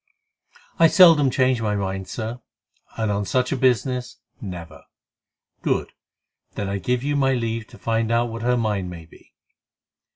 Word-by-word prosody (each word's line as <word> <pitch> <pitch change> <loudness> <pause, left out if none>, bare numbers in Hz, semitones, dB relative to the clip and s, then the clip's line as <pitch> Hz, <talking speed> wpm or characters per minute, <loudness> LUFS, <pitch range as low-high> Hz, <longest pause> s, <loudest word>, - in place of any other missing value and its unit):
"I 165 - +8
seldom 165 -6 +6
change 130 -2 +1
my 105 -2 0
mind, 95 -1 -3
Sir, 120 +2 -5 0.6
and 110 -2 0
on 100 0 -1
such 125 +5 0
a - - +1
business, 125 0 0 0.2
never." 85 -5 -8 0.8
"Good! - - -1 0.6
Then 100 - -3
I 100 0 -2
give 125 +3 -1
you 145 +1 0
my 135 -1 +2
leave 115 -2 -3
to 120 - -15
find 115 0 -1
out 120 +1 +2
what 115 0 -6
her 125 +1 +1
mind 105 -5 -1
may 85 -2 -9
be." 80 - -21
115 Hz, 160 wpm, -23 LUFS, 100-125 Hz, 0.8 s, I